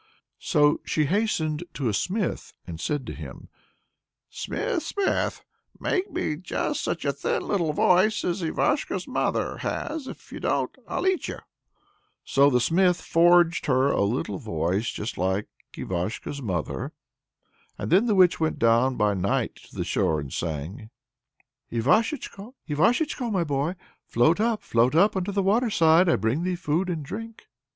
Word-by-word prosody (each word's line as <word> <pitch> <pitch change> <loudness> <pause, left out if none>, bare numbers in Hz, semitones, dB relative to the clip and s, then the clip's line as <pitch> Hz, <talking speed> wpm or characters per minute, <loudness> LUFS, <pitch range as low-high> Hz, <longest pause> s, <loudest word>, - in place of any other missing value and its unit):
So 150 -3 +2
she 155 - 0
hastened 160 -4 0
to 135 - -1
a 110 - 0
smith 185 - -2
and 85 -2 -7
said 145 +2 -2
to - - -6
him: - - -10 0.8
"Smith, 455 -9 -2
smith! 400 +3 -1 0.4
make 375 +1 -1
me 150 - -2
just 180 +2 -2
such 165 - -2
a 140 - +1
thin 140 - -2
little 170 -6 +1
voice 185 +8 +3
as 180 +2 -1
Ivashko's 280 - 0
mother - - -1
has: 305 -5 -4
if - - -10
you - - -7
don't, - - -1
I'll - - -2
eat 375 -1 +1
you." - - -5 0.9
So 140 +1 +4
the 125 -3 +3
smith 180 +7 +3
forged 170 0 +4
her 135 0 +3
a - - +1
little 100 -2 -1
voice 90 +7 -1
just 110 +4 -5
like 95 +3 0 0.3
Ivashko's 95 +10 -4
mother's. 90 - -3 0.9
Then 195 +8 +2
the 215 - +2
witch 185 -2 +5
went 160 -1 0
down 115 +3 +3
by 105 -2 +2
night 100 0 0
to - - -18
the - - -2
shore 80 - +1
and 70 -3 -7
sang: 85 - -4 0.8
Ivashechko, 210 - 0
Ivashechko, 240 - +1
my 190 -4 +1
boy, 145 +3 -1 0.3
Float 140 - +3
up, 225 0 0
float 120 +5 +2
up, 200 +5 +4
unto 190 +1 -1
the 200 0 0
waterside; 185 -5 +4
I - - +4
bring 115 - 0
thee 180 +1 -1
food 170 +2 -1
and 160 -5 -3
drink. 225 +8 -8
160 Hz, 155 wpm, -25 LUFS, 120-195 Hz, 0.9 s, witch